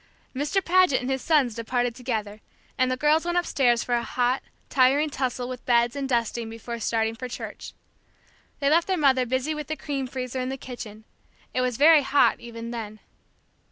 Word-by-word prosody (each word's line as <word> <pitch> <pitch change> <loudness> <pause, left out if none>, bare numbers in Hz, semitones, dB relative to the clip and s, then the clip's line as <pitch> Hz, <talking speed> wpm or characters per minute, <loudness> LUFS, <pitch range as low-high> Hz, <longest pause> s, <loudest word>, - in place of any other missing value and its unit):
Mr. 295 +8 0
Paget 365 -5 +4
and 255 +1 -3
his 265 -1 -1
sons 285 -7 +2
departed 245 +1 -1
together, 220 -4 -4 0.3
and 255 0 +2
the 255 - -1
girls 300 +4 +3
went 345 0 -1
upstairs 255 -9 +2
for 245 - -2
a 240 - +2
hot, 250 +2 0 0.3
tiring 280 +3 +3
tussle 255 -2 -2
with 255 -1 -7
beds 235 0 +3
and 275 -1 -3
dusting 235 -2 -1
before 230 +1 -7
starting 225 0 0
for 250 +2 -6
church. 245 - -8 0.9
They 280 -1 +2
left 335 +2 +3
their 380 -1 +1
mother 265 -5 +3
busy 260 +5 -1
with 300 -2 -6
the 310 - -3
cream 275 -3 -3
freezer 255 0 -4
in 255 0 -2
the 270 - -4
kitchen. 225 -4 -9 0.5
It 255 - +1
was 250 -2 -1
very 310 +1 +7
hot 270 -3 +3
even 230 0 -8
then. 215 -2 -6
255 Hz, 190 wpm, -25 LUFS, 235-285 Hz, 0.9 s, very